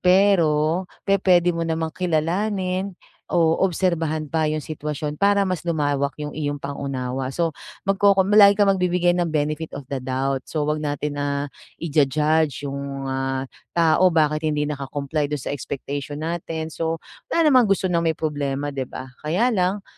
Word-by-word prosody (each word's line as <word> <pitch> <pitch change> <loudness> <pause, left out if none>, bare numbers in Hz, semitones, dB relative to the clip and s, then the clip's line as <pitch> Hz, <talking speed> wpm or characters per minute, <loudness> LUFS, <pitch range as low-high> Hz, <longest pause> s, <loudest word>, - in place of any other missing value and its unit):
Pero 180 -3 +3 0.2
pepuwede 180 -3 +3
mo 165 0 -2
namang 160 0 -1
kilalanin 185 +3 -1 0.3
o 165 -1 +2
obserbahan 165 -4 0
pa 155 +1 0
yung 155 -1 -2
sitwasyon 150 -1 -4
para 200 0 +4
mas 185 -4 -1
lumawak 145 -3 0
yung 150 -1 -5
iyong 145 -1 -2
pang-unawa. 135 -2 -4
So, 165 +4 -1 0.3
magkokom 195 0 +3
lagi 205 -1 +8
kang 200 -2 +4
magbibigay 180 -1 +2
ng 175 -1 0
benefit 155 0 -2
of 140 - -7
the 135 - -1
doubt. 130 +1 -2
So, 155 -2 -1
huwag 150 +1 -1
natin 145 -1 -3
na 140 0 -2 0.2
i-ju-judge 150 -1 +1
yung 140 0 -4
mga 135 0 -2 0.3
tao. 170 +2 +5
Bakit 155 -1 +1
hindi 150 -1 0
naka-comply 145 +1 -2
do'n 145 -3 -4
sa - - -3
expectation 145 +2 -5
natin? 160 -1 -4
So, 165 0 -3 0.2
wala 320 -3 +3
naman 250 -4 +5
gusto 195 -1 +1
ng 175 -2 +2
may 160 - 0
problema, 145 -2 -2
'di 135 -2 -4
ba? 130 -1 -8
Kaya 185 +12 +1
lang 195 0 0
155 Hz, 155 wpm, -23 LUFS, 145-180 Hz, 0.3 s, lagi